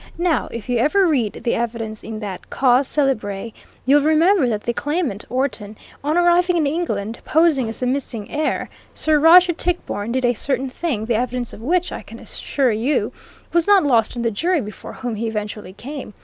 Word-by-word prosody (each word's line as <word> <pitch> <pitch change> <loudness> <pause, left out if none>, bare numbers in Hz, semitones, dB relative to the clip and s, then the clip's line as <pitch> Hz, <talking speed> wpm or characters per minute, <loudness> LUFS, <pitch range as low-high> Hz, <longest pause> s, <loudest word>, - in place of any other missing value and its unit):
Now, 345 -2 +1
if 230 -3 -7
you 245 -2 +1
ever 370 +10 +3
read 260 - 0
the 235 - +1
evidence 225 -2 -3
in 220 0 -6
that 190 -3 -7
cause 255 0 +3
célèbre, 225 -7 -1 0.3
you'll 285 +3 +5
remember 315 0 +3
that 210 -2 -2
the 235 - -1
claimant, 290 - -2
Orton, 240 -5 -2 0.3
on 305 +3 +1
arriving 350 0 +3
in 315 - +2
England, 235 -9 -2
posing 305 -7 +2
as 225 - -6
the - - +1
missing 250 -5 -3
heir, 305 +1 -1 0.3
Sir 310 -1 +2
Roger 345 +3 +7
Tichborne, 330 -11 -2
did 260 +1 0
a 245 - +3
certain 265 +2 -1
thing, 255 -9 -2
the 235 - 0
evidence 245 +1 -2
of - - -10
which, 355 +8 0
I - - -5
can - - -12
assure 270 -4 -1
you, 230 +7 0 0.4
was 340 +1 +2
not 405 -2 +6
lost 235 -6 +2
on 235 - -2
the 230 - +1
jury 340 - +1
before 210 -5 -8
whom 245 -4 -5
he 230 +2 -2
eventually 210 -3 -5
came. 255 -1 -8
255 Hz, 190 wpm, -20 LUFS, 225-315 Hz, 0.4 s, Roger